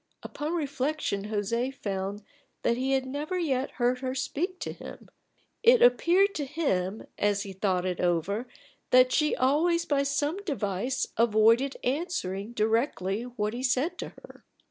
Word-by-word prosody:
Upon 305 +4 -4
reflection 285 -8 -2
José 225 +4 -1
found 200 -4 -4 0.4
that 235 - +2
he 260 +2 0
had 265 -1 +1
never 295 +7 -3
yet 275 -6 0
heard 250 0 +1
her 260 0 -3
speak 355 +7 -2
to - - -4
him: - - -11 0.5
it 475 +1 +6
appeared 345 - +4
to 290 - -3
him 220 - -1
as 205 -1 +1
he 195 -2 -8
thought 185 -1 0
it 180 -2 -2
over 180 +7 0 0.4
that 255 0 +6
she 300 -1 +2
always 335 +6 +2
by 285 -2 +1
some 290 +4 0
device 250 - -1
avoided 230 +4 +4
answering 245 - -2
directly 220 -3 0
what 235 -3 -3
he 245 - -4
said 260 +5 0
to - - -4
her. - - -16
255 Hz, 150 wpm, -28 LUFS, 210-290 Hz, 0.5 s, it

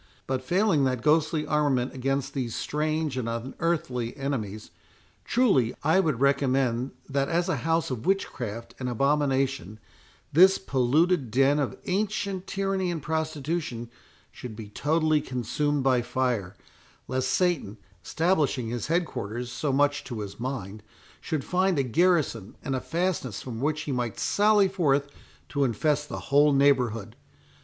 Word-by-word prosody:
But 130 -1 -2
failing 180 0 +2
that 130 -2 -1
ghostly 155 0 +2
armament 140 -4 +1
against 135 +1 -2
these 125 -5 -3
strange 155 -1 -1
and 120 -2 -2
unearthly 125 0 -2
enemies, 110 -7 -4 0.5
truly 140 - +2
I 160 +6 +4
would 155 -10 +1
recommend, 135 -2 +1
that 140 0 0
as 170 +2 +1
a 175 -6 0
house 165 +3 0
of 120 -3 -4
witchcraft 120 - -2
and 125 -1 -2
abomination, 135 -4 0 0.5
this 190 +5 +7
polluted 140 0 +1
den 135 +5 +3
of 140 - -2
ancient 195 -1 -2
tyranny 195 -2 -1
and 170 -2 -2
prostitution 155 -6 -3 0.4
should 120 -4 -8
be 105 -1 -8
totally 155 +5 +1
consumed 140 +3 -1
by 130 -2 +3
fire, 120 -6 -1 0.5
lest 130 0 -1
Satan, 135 - 0 0.3
establishing 150 - +1
his 120 -2 -3
head 170 +3 +2
quarters 120 -1 -5
so 145 +2 -1
much 145 +1 +2
to 120 -5 -5
his 100 +1 -7
mind, 115 -5 -5 0.4
should 155 -5 -3
find 185 +1 +1
a 140 - +2
garrison 135 - +1
and 135 - -2
a 130 - -2
fastness 165 - -2
from 120 -3 -6
which 155 +2 0
he 150 - -4
might 120 -4 -2
sally 205 -1 +4
forth 145 -7 +1 0.4
to 140 -1 0
infest 150 +4 0
the - - -4
whole 145 +1 +4
neighbourhood. 130 -6 +2
140 Hz, 145 wpm, -27 LUFS, 125-160 Hz, 0.5 s, this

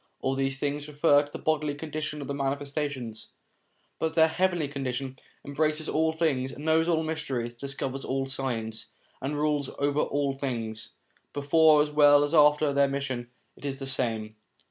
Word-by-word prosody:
All 135 - 0
these 135 0 -1
things 145 +1 -2
refer 145 -1 +4
to 145 - -13
the - - -6
bodily 150 -2 0
condition 150 0 -4
of - - -8
the 140 - -3
Manifestations; 140 -4 -3 0.7
but 160 0 -1
their 160 -1 +5
heavenly 175 -2 +1
condition 135 -1 -4 0.3
embraces 155 +2 0
all 160 +1 +2
things, 145 -5 -1
knows 160 +2 +2
all 160 -2 +2
mysteries, 140 -7 -3
discovers 135 +1 -4
all 135 0 -1
signs, 120 -5 -3 0.3
and 145 +3 -2
rules 150 -2 0
over 145 +1 +1
all 145 -2 0
things; 115 -5 -4 0.4
before 150 +1 +5
as 150 - -5
well 145 -1 +6
as 145 +2 -2
after 150 -1 +5
their 140 0 +4
mission, 135 -3 -3 0.3
it - - -17
is 140 -1 -3
the 135 - -6
same. 115 -5 -1
145 Hz, 165 wpm, -27 LUFS, 135-150 Hz, 0.7 s, well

